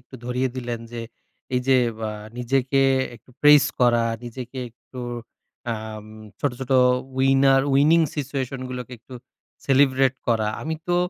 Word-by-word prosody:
একটু 125 - -18
ধরিয়ে 125 +1 -1
দিলেন। 120 -2 -4
যে 120 - -5 0.6
এইযে 130 +1 +3 0.3
আ - - -3 0.3
নিজেকে 135 +2 +1 0.3
একটু 125 - -18
প্রেইস 150 -1 +7 0.2
করা, 120 -1 +4 0.2
নিজেকে 125 +2 -7
একটু 125 +2 -12 0.7
আম 110 -1 -7 0.3
ছোট, 145 - +1
ছোট 130 - -6 0.5
উইনার 135 0 +4
উইনিং 150 +5 +5 0.2
সিচুয়েশন 135 -2 -3
গুলোকে 125 -1 -6
একটু 125 +3 -13 0.5
সেলিব্রেট 135 -1 +4
করা। 110 -2 +2
আমি 160 +1 -2
তো 175 - +2
130 Hz, 130 wpm, -23 LUFS, 120-135 Hz, 0.7 s, প্রেইস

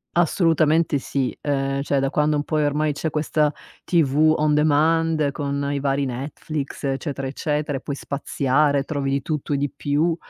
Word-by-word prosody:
Assolutamente 165 -3 +3
sì. 135 -1 -2
Ehm, 135 -1 -1
cioè 140 -1 0
da 135 0 0
quando 150 0 +2
un 145 - 0
pò, 155 0 -1
ehm, 150 - +2
ormai 150 +1 +1
c'è 160 +2 -2
questa 150 0 +1 0.3
TV 155 -2 +3
on 150 0 +2
demand, 155 0 +2
con 140 -1 -2
i 140 - -1
vari 140 0 0
Netflix 140 +3 -5
eccetera, 135 0 -2
eccetera 145 0 -2
e - - -23
puoi 140 - -4
spaziare, 140 0 0
trovi 140 -1 -2
di 140 0 0
tutto 150 -2 -2
e - - +1
di 140 0 -1
più, 155 +4 0
145 Hz, 175 wpm, -22 LUFS, 140-155 Hz, 0.3 s, Assolutamente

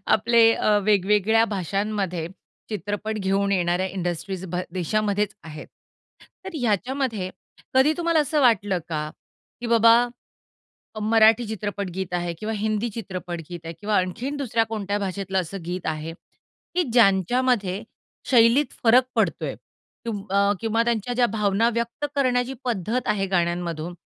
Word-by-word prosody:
आपले 230 +1 +5
अ, 210 -2 +2
वेगवेगळ्या 210 +2 +3
भाषांमध्ये 195 -3 -2 0.4
चित्रपट 210 +1 -3
घेऊन 200 +1 +1
येणाऱ्या 180 0 +1
इंडस्ट्रीज 185 0 -4
भा 180 +1 -2
देशामध्येच 205 +3 0
आहेत. 155 -2 -9 0.8
तर 380 - -5
ह्याच्यामध्ये 225 -2 -1 0.4
कधी 265 +4 +5
तुम्हाला 335 -2 +2
असं 300 +1 +1
वाटलं 205 -7 +3
का? 155 -2 -3 0.5
की 240 - -4
बाबा, 230 0 +6 1.0
अ, 215 - -6
मराठी 220 +2 +4
चित्रपट 205 -3 -4
गीत 185 -1 -4
आहे 175 -1 -2
किंवा 220 +3 -3
हिंदी 215 +2 -1
चित्रपट 180 -4 -5
गीत 175 -2 -6
आहे 165 0 -6
किंवा 210 0 0
आणखीन 235 +10 -1
दुसऱ्या 235 -5 0
कोणत्या 205 -1 -2
भाषेतलं 190 -1 -2
असं 185 +1 -6
गीत 180 0 -4
आहे, 160 +1 -3 0.6
की 360 - +3
ज्यांच्यामध्ये 205 -1 +2 0.5
शैलीत 240 +4 +5
फरक 245 +3 +6
पडतोय. - - 0 0.5
तुम 205 -3 -3
अ, 200 +1 +3
किंवा 225 0 +1
त्यांच्या 235 0 -1
ज्या 245 0 +3
भावना 210 +1 +2
व्यक्त 235 +5 -3
करण्याची 255 -2 +1
पद्धत 235 +1 -2
आहे 200 -2 +1
गाण्यांमधून, 175 -2 -1
205 Hz, 135 wpm, -24 LUFS, 185-230 Hz, 1.0 s, बाबा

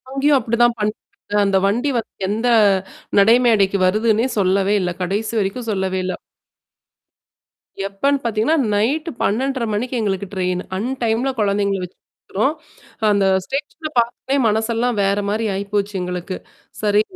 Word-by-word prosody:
அங்கேயும் 275 +1 +3
அப்படிதான் 235 +1 +2
பண்ணாங்க 210 +1 -2 0.4
அந்த 195 -1 +3
வண்டி 240 +8 +1
வந்து 225 - -6 0.2
எந்த 225 +4 0 0.7
நடைமடைக்கு 215 -2 +4
வருதுன்னே 220 +4 +2
சொல்லவே 195 +1 +2
இல்ல. 180 -1 -1
கடைசி 205 +5 -2
வரைக்கும் 220 +5 -3
சொல்லவே 190 -2 -1
இல்ல. 185 0 -2 1.7
எப்பன்னு 275 +9 +1
பாத்தீங்கன்னா, 230 +7 +1 0.2
நைட்டு 280 +11 0
12:30 260 +4 0
மணிக்கு 235 +5 -2
எங்களுக்கு 200 -2 -1
ட்ரெயின்னு. 180 -1 -1
அன் 225 +6 -2
டைம்ல 230 +3 +1
குழந்தைங்கள 200 -1 +1
வச்சுருக்குறோம். 210 +7 -4 0.6
அந்த 200 -1 +3 0.2
ஸ்டேஷன்ல 290 - -4
பார்த்தனே 245 +3 0
மனசெல்லாம் 225 +2 0
வேற 200 +1 +1
மாரி 220 +2 0
ஆயி 195 +1 -2
போச்சு 205 0 0
எங்களுக்கு. 180 +1 -4 0.5
சரி. 210 0 +3
215 Hz, 125 wpm, -20 LUFS, 195-240 Hz, 1.7 s, நடைமடைக்கு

